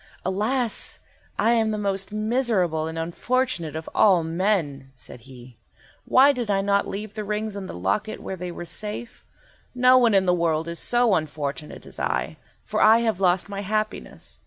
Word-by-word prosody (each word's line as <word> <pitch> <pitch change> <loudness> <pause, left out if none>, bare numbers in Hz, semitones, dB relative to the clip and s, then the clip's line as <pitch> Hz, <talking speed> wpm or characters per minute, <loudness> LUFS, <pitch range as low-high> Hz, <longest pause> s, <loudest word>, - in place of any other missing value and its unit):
"Alas! 220 +5 -1 0.4
I 230 - +3
am 225 -2 +2
the 215 - -1
most 195 -1 -2
miserable 215 -8 0
and 160 0 -6
unfortunate 170 - -1
of 160 0 -6
all 185 -5 +4
men," 160 -6 -1
said 125 - -9
he. 125 -2 -13 0.5
"Why 275 +3 +6
did 245 -5 -4
I 195 -1 +2
not 200 0 +1
leave 210 +1 -6
the 215 -1 -4
rings 210 0 -3
in 195 -2 -6
the - - -7
locket 95 - -1
where 190 - -5
they 180 -1 -6
were 175 - -7
safe? 210 +7 -5 0.5
No 255 +1 +6
one 235 -4 +4
in 190 -1 +4
the 180 - +3
world 165 -2 0
is 170 0 -4
so 240 -3 +2
unfortunate 150 -2 -3
as - - -10
I, - - -2 0.3
for - - -1
I 225 +2 +6
have 220 -5 0
lost 185 0 +2
my 200 -1 -5
happiness. 215 +2 -4
200 Hz, 180 wpm, -24 LUFS, 165-220 Hz, 0.5 s, Why